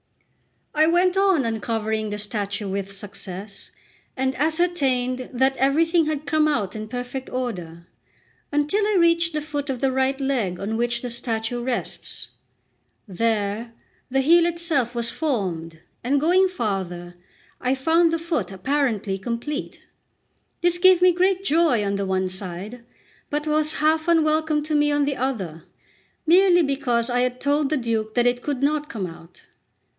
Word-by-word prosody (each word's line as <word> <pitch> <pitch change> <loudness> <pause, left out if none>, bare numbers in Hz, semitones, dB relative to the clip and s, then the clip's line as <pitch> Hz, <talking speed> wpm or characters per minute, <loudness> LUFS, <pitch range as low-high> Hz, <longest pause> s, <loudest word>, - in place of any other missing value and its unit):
I 310 +1 +4
went 355 +2 +3
on 385 -8 +3
uncovering 220 -1 -2
the 210 - -4
statue 205 -1 -3
with 195 0 -3
success, 195 0 -8 0.5
and 265 0 0
ascertained 270 -5 0
that 265 +2 +2
everything 325 +5 +3
had 305 -1 -2
come 305 +1 +2
out 210 -10 -1
in 215 0 -5
perfect 250 +3 -5
order, 175 -10 -5 0.7
until 295 +8 +1
I 425 - +1
reached 335 -1 +3
the 300 -1 -2
foot 290 -1 -4
of 260 -2 -2
the 270 0 +1
right 265 +1 0
leg 245 -10 -1
on 215 +3 -2
which 240 +1 0
the 245 - -3
statue 235 0 -3
rests. 245 0 -4 0.8
There 220 +2 -1 0.4
the 270 +1 +2
heel 335 +4 +5
itself 320 -8 0
was 235 -1 0
formed, 180 - -2 0.2
and 275 +4 +2
going 360 +6 +4
farther, 190 - -4 0.5
I 255 +1 0
found 325 +5 +3
the 330 - +1
foot 320 - -2
apparently 215 -2 -1
complete. 240 - -5 0.8
This 350 0 +2
gave 370 -1 +6
me 365 - +7
great 370 +2 +1
joy 310 - +2
on 200 - -1
the 200 -1 -2
one 190 0 0
side, 190 +5 -5 0.5
but 295 +1 -2
was 305 0 +2
half 315 +1 +1
unwelcome 315 -2 +2
to 305 +1 -3
me 295 0 +3
on 290 0 +2
the 280 -1 -2
other, 195 -12 -3 0.6
merely 355 +1 +5
because 250 -5 0
I 245 -1 0
had 250 0 0
told 285 0 +1
the 305 - +1
Duke 225 -3 -2
that 240 -1 +3
it 245 0 +2
could 280 -1 -3
not 295 +1 0
come 205 -5 -4
out. 165 0 -12
260 Hz, 155 wpm, -23 LUFS, 215-310 Hz, 0.8 s, me